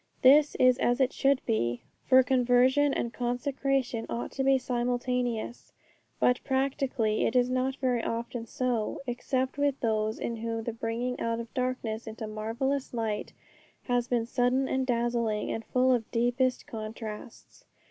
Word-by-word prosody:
This 290 Hz, +3 st, +6 dB
is 255 Hz, 0 st, +4 dB
as 245 Hz, +2 st, +2 dB
it 265 Hz, -1 st, +2 dB
should 275 Hz, -1 st, +2 dB
be, 120 Hz, -, -1 dB, 0.2 s
for 260 Hz, 0 st, +7 dB
conversion 255 Hz, +3 st, +3 dB
and 235 Hz, -3 st, -2 dB
consecration 250 Hz, -1 st, -1 dB
ought 235 Hz, -, -4 dB
to 270 Hz, -, -2 dB
be 270 Hz, 0 st, +4 dB
simultaneous. 245 Hz, -1 st, -2 dB, 0.5 s
But 250 Hz, 0 st, +2 dB
practically 265 Hz, -5 st, 0 dB
it 230 Hz, -, -3 dB
is 250 Hz, 0 st, +3 dB
not 255 Hz, +1 st, 0 dB
very 250 Hz, -3 st, 0 dB
often 230 Hz, 0 st, -4 dB
so, 245 Hz, 0 st, -2 dB
except 260 Hz, +2 st, -2 dB
with 285 Hz, -1 st, +1 dB
those 220 Hz, -1 st, 0 dB
in 235 Hz, -, -3 dB
whom 225 Hz, 0 st, -3 dB
the 235 Hz, -, -3 dB
bringing 230 Hz, +2 st, -3 dB
out 230 Hz, 0 st, -1 dB
of 230 Hz, -1 st, -8 dB
darkness 250 Hz, -4 st, -2 dB
into 220 Hz, 0 st, -6 dB
marvellous 230 Hz, +6 st, -2 dB
light 220 Hz, -2 st, -2 dB, 0.5 s
has 245 Hz, -1 st, 0 dB
been 240 Hz, -2 st, 0 dB
sudden 250 Hz, +3 st, +1 dB
and 260 Hz, 0 st, -1 dB
dazzling, 235 Hz, -3 st, 0 dB
and 225 Hz, -, -3 dB
full 255 Hz, +1 st, +2 dB
of 230 Hz, -3 st, -1 dB
deepest 245 Hz, +2 st, +1 dB
contrasts. 220 Hz, -2 st, -8 dB
245 Hz, 150 wpm, -29 LUFS, 230-260 Hz, 0.5 s, for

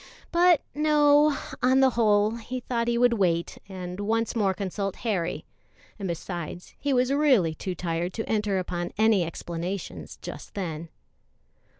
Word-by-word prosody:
But 345 Hz, -2 st, +5 dB
no; 295 Hz, -1 st, +4 dB, 0.2 s
on 260 Hz, +1 st, +4 dB
the 265 Hz, -1 st, +5 dB
whole, 215 Hz, -1 st, +3 dB
he 250 Hz, +3 st, -5 dB
thought 235 Hz, -1 st, -2 dB
he 235 Hz, 0 st, +1 dB
would 245 Hz, 0 st, +4 dB
wait 175 Hz, -6 st, 0 dB
and 180 Hz, -1 st, -6 dB
once 225 Hz, +3 st, 0 dB
more 205 Hz, -4 st, +2 dB
consult 195 Hz, 0 st, -3 dB
Harry, 185 Hz, -7 st, -1 dB, 0.5 s
and, 195 Hz, -, -3 dB
besides, 175 Hz, 0 st, -5 dB
he 285 Hz, -, -1 dB
was 255 Hz, +1 st, +2 dB
really 260 Hz, -, +3 dB
too 185 Hz, +3 st, -5 dB
tired 170 Hz, +1 st, -2 dB
to 225 Hz, -, -4 dB
enter 210 Hz, -3 st, 0 dB
upon 175 Hz, -1 st, -3 dB
any 215 Hz, -3 st, +4 dB
explanations 170 Hz, +3 st, -5 dB
just -, -, -8 dB
then. 165 Hz, -4 st, -4 dB
205 Hz, 150 wpm, -26 LUFS, 180-250 Hz, 0.5 s, But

